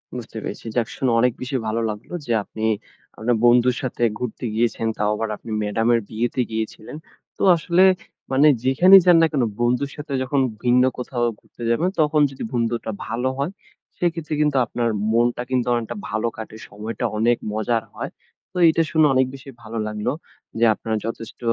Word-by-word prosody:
বুঝতে - - -7
পেরেছি। - - -6
যাক, 120 -3 +1
শুনে 130 -3 0
অনেক 125 -1 +3
বেশি 130 +1 -4
ভালো 115 +1 -1
লাগলো 105 +9 -7
যে, 120 - -3
আপনি 110 - -8 0.5
আপনার 115 +2 +1
বন্ধুর 120 +1 +5
সাথে 125 -2 -3 0.2
ঘুরতে 125 0 -4
গিয়েছেন। 115 0 0
তাও 105 0 +1
আবার, 115 +1 -2
আপনি 115 - -10
ম্যাডামের 115 +3 +2
বিয়েতে 120 +3 -1
গিয়েছিলেন। 110 +5 -5 0.4
তো, - - -3
আসলে 170 +3 +3 0.5
মানে 140 +3 +5 0.2
যেখানেই 180 +9 +7
যান 175 -2 +7
না 165 - +5
কেন, 135 -5 +1 0.2
বন্ধুর 125 +4 +1
সাথে 150 -1 -6
যখন 135 +2 0 0.2
ভিন্ন 125 +1 +4
কোথাও 125 -1 -3 0.2
ঘুরতে 120 - -13
যাবেন, 160 +10 +2
তখন 150 0 +3
যদি 135 - -7
বন্ধুটা 115 -1 -1 0.2
ভালো 120 +3 -1
হয়, 140 +6 -1 0.5
সেক্ষেত্রে 165 -3 -2
কিন্তু 150 -2 +2
আপনার 120 +1 -1 0.2
মনটা 120 +1 +2
কিন্তু 125 -1 0
অনেকটা 115 -2 -2
ভালো 110 +2 -1
কাটে। 110 0 -8
সময়টা 110 +4 -5
অনেক 120 +2 +3
মজার 110 +1 0
হয়। - - -5 0.4
তো 185 - -8
এইটা 165 +1 +4
শুনে 155 -1 +4
অনেক 130 0 +4
বেশি 135 +1 -12
ভালো 115 0 -7
লাগলো 105 +3 -2 0.5
যে, 120 - +5
আপনারা 110 +1 -3
যথেষ্ট 115 -1 -6
120 Hz, 175 wpm, -22 LUFS, 115-140 Hz, 0.5 s, যেখানেই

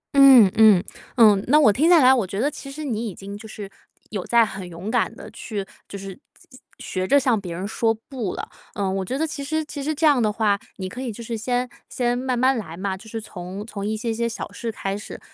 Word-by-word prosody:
嗯， 265 -8 +8
嗯， 215 -5 +7 0.3
嗯， 210 -4 +6
那 295 +5 +5
我 245 -9 +5
听 305 +10 +3
下 350 -2 +7
来， 255 +1 +7
我 235 -7 +1
觉 195 +2 -4
得 285 +6 +1
其 275 - -9
实 305 +3 -7
你 235 -5 -2
已 190 - -9
经 200 +1 -8
就 215 +2 -10
是 205 -2 -8 0.4
有 200 -4 -3
在 235 +2 +4
很 190 -4 -7
勇 175 +5 -6
敢 235 -1 +1
地 - - -10
去 205 -4 -5 0.2
就 200 - -6
是 195 -1 -9 0.6
学 185 0 -3
着 285 - +5
向 250 -5 +2
别 175 -3 -6
人 185 +3 -4
说 225 +1 +1
不 225 -2 -5
了。 - - -5 0.3
呃， 200 -2 -1
我 190 0 -1
觉 255 +8 -3
得 320 - +1
其 305 -3 -5
实 315 +2 -2
其 290 -1 -7
实 305 +3 -2
这 320 +2 +1
样 290 -5 +5
的 215 -2 +2
话， 210 -1 +1 0.2
你 190 -2 -4
可 245 +7 -7
以 255 -3 -3
就 235 +2 -9
是 230 0 -4
先 245 +3 -1 0.2
先 245 -1 0
慢 255 0 -1
慢 260 +2 +3
来 170 -8 -6
嘛， 190 +1 -2
就 220 +4 -13
是 225 - -4
从 190 -1 -8
从 205 -3 -7
一 215 +1 -1
些 230 +1 -2
些 235 +1 -1
小 230 - -6
事 230 - -5
开 195 -2 -3
始， 205 - -8
225 Hz, 270 characters per minute, -23 LUFS, 200-255 Hz, 0.6 s, 嗯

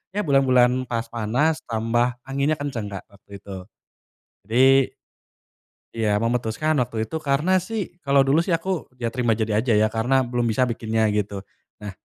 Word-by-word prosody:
Ya 210 - 0
bulan-bulan 130 -4 +3
pas 115 -1 -2
panas 125 +8 0
tambah 120 +2 0
anginnya 140 +3 0
kenceng, 140 -8 -4
Kak, 100 -2 -7
waktu 100 0 -22
itu. 100 -1 -8 0.9
Jadi 130 +3 +4 1.0
Iya 110 -2 +1
memutuskan 120 +6 0
waktu 120 -2 -4
itu - - -5
karena 145 +6 +1 0.2
sih, 225 -1 -2 0.2
kalo 140 0 +2
dulu 140 +4 +4
sih 180 - 0
aku, 170 +3 -7 0.3
iya 120 - -1
terima 120 -3 +1
jadi 110 0 -1
aja 115 +3 +1
ya 110 - +4
karena 125 +4 +2
belum 120 -1 -1
bisa 120 +4 +2
bikinnya 110 -1 -2 0.2
gitu. 105 -1 -2 0.5
Nah 105 -1 -6
125 Hz, 160 wpm, -23 LUFS, 115-140 Hz, 1.0 s, Jadi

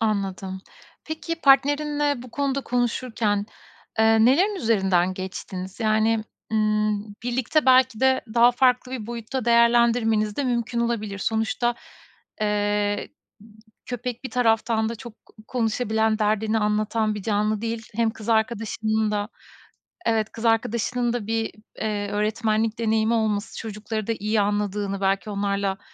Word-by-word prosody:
Anladım. 195 -3 -2 0.4
Peki, 330 +1 -5
partnerinle 290 0 +3
bu 250 - -12
konuda 275 0 -1
konuşurken, 235 -4 -1 0.5
eee, 220 0 +5
nelerin 360 - +4
üzerinden 190 - +2
geçtiniz? 185 +1 -6
Yani, 220 0 +2 0.3
ımm, 215 -1 0
birlikte 255 +4 0
belki 255 -3 +5
de 265 0 +4
daha 240 +1 +6
farklı 250 0 +2
bir 225 -5 -5
boyutta 235 +1 -4
değerlendirmeniz 235 -2 +3
de 285 - 0
mümkün 235 -1 -1
olabilir. 215 -4 -2
Sonuçta, 225 +3 0 0.7
eee, 205 0 0 0.8
köpek 245 0 -5
bir - - -4
taraftan 225 -2 +2
da 230 - -4
çok 235 -1 -12
ko - - -22 0.2
konuşabilen, 220 -2 0
derdini 215 +1 +1
anlatan 215 +1 0
bir 205 - -6
canlı 210 0 0
değil. 230 -1 -4
Hem 230 0 +2
kız 220 0 -11
arkadaşının 220 -1 0
da 205 0 -1 0.8
evet, 220 -1 +1
kız 230 - -8
arkadaşının 235 +2 +1
da 235 -4 -3
bir, 225 0 -1 0.3
eee, 205 -2 -2
öğretmenlik 220 +1 0
deneyimi 220 0 +2
olması 215 -2 -1
çocukları 215 0 -5
da 230 - 0
iyi 215 +1 +1
anladığını, 205 -1 -1
belki 195 +2 0
onlarla 200 -1 -1
220 Hz, 130 wpm, -24 LUFS, 210-240 Hz, 0.8 s, daha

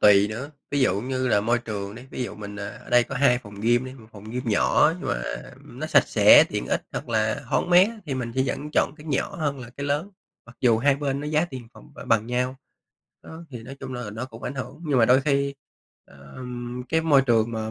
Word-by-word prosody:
tùy 100 0 +6
nữa, 120 +7 -6 0.2
ví 145 - 0
dụ 100 -7 +2
như 130 +2 -2
là 105 -4 +3
môi 120 +3 +1
trường 105 -4 -5
đi, 120 - -10
ví - - -4
dụ - - -6
mình, 105 -1 -8
ờ, 100 0 -5
ở - - -12
đây 120 0 +5
có 135 - -7
2 125 -2 +4
phòng 105 -4 -12
gym 120 +3 +2
đi, 130 - -7
1 115 -5 -15
phòng 105 -1 -12
gym 125 +2 -3
nhỏ 150 +8 +4
nhưng - - -4
mà, - - -1 0.3
ừm, - - -15
nó - - -3
sạch - - +4
sẽ, - - +7
tiện - - -3
ích - - 0
hoặc 140 - -5
là 110 +4 0
thoáng - - 0
mát 180 +2 +7
á, 230 -1 -9
thì 140 - -2
mình 120 -3 -4
sẽ 130 - +3
vẫn 145 +3 -3
chọn - - +2
cái 150 -1 -13
nhỏ 150 +6 -1
hơn 145 -4 -2
là 120 - -9
cái 140 +3 -6
lớn, 150 +8 -1 0.4
mặc 120 - -15
dù 115 -3 +4
hai 140 +3 +3
bên 140 -1 -2
nó 150 - -5
giá 155 +2 +2
tiền 130 -8 -9
phòng - - -17
b - - -18
bằng 115 -1 +2
nhau. 125 +2 -1 0.7
Đó, 160 +1 -10
thì 120 -4 -8
nói 130 +4 -9
chung 130 -1 -6
là 125 -4 -5
nó 110 +4 -5
cũng 115 -3 -13
ảnh 135 - -4
hưởng, 135 +4 -7
nhưng 140 -4 +2
mà 115 - +6
đôi 125 +3 +5
khi, 140 0 0 0.5
ờm, 120 - -8
cái 160 +3 +2
môi 150 -4 +4
trường 115 -2 +2
mà 110 -1 -3
125 Hz, 260 wpm, -25 LUFS, 115-140 Hz, 0.7 s, sẽ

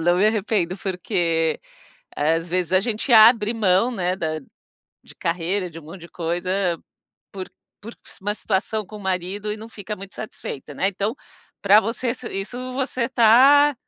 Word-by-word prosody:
"Não 175 +2 +3
me 195 +4 +4
arrependo". 205 -4 0
Porque, 175 -4 -1 0.6
às 165 +3 0
vezes 180 -1 -1
a 185 - +6
gente 225 +5 -2
abre 220 0 +7
mão, 210 +2 +2
né, 185 -5 -1
da 155 -3 -3 0.6
de - - -16
carreira, 180 +2 -2
de 165 - -10
um - - -12
monte 165 +3 -11
de 170 - -11
coisa 175 +1 -1 0.5
por 190 -2 -6 0.3
por 225 +3 -10 0.3
uma 205 +2 -2
situação 215 +1 -1
com 215 - -10
o - - -10
marido 190 +2 -3
e 210 - -5
não 220 +1 -10
fica 210 0 -6
muito 195 +1 -10
satisfeita, 145 -8 -7
né, 190 - +1
então, 205 +3 -2 0.5
pra 205 +2 +7
você 230 +3 -2
se 250 - -8
isso 245 +6 -5
você 260 -2 -1
tá, 265 +5 +6
195 Hz, 170 wpm, -22 LUFS, 175-220 Hz, 0.6 s, abre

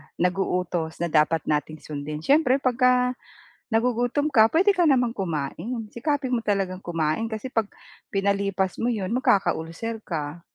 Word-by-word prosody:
nag-uutos 180 -2 -1
na 170 - -2
dapat 155 +1 +3
nating 150 +1 -2
sundin. 150 +1 -6
Siyempre 280 - +4
'pag 255 -3 0
ka 250 -1 +6 0.8
nagugutom 245 +5 +1
ka, 220 -3 +6
puwede 380 - +4
ka 350 -4 +3
naman 245 -4 +2
kumain. 185 - -3
Sikapin 275 +1 -1
mo 235 - +1
talagang 195 -3 -1
kumain 165 +5 -1
kasi 220 +3 -6
'pag 220 -3 0 0.4
pinalipas 195 -1 0
mo 235 - +1
'yon, 210 -3 -2
magkaka-ulcer 210 -2 0
ka. 160 -3 -5
200 Hz, 140 wpm, -25 LUFS, 165-245 Hz, 0.8 s, ka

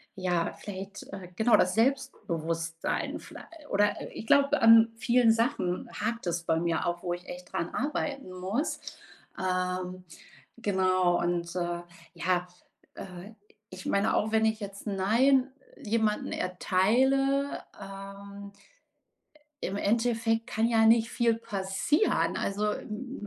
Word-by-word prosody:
ja, 180 -3 0
vielleicht, 195 0 -8
äh 185 -3 -8
genau 225 +3 +4
das 185 - +2
Selbstbewusstsein 170 - -1
viellei - - -11 0.2
oder 205 +1 +1
ich 220 - -7
glaube 280 +2 +4
an 225 0 +7
vielen 235 0 +4
Sachen 225 -6 0
hakt 230 -1 -3
es 170 0 -1
bei 160 -1 +1
mir 170 -1 0
auch, 175 +1 -2
wo 175 - -1
ich 175 +1 -7
echt 180 0 -9
dran 170 - -1
arbeiten 275 -5 -3
muss. 190 - -2 0.6
Ähm, 185 0 -2 0.6
genau 185 -4 +2
und, 170 0 -1
äh, 175 -1 -2 0.3
ja, 180 +1 0 0.5
äh, 185 +4 -9 0.4
ich 185 0 -10
meine 200 +2 +2
auch, 215 +1 +1
wenn 220 0 +3
ich 220 0 +1
jetzt 200 +1 -7
'n 200 - -1
Nein 255 +7 +3 0.3
jemanden 215 -1 0
erteile, 265 +10 +1 0.2
ähm 200 +1 -9 1.1
im 195 - -2
Endeffekt 225 +1 +1
kann 225 +1 +1
ja 225 -1 +4
nicht 230 0 +5
viel 230 -1 +2
passieren. 205 - 0
Also, 205 +2 -1
m 215 0 -7
200 Hz, 130 wpm, -29 LUFS, 180-230 Hz, 1.1 s, an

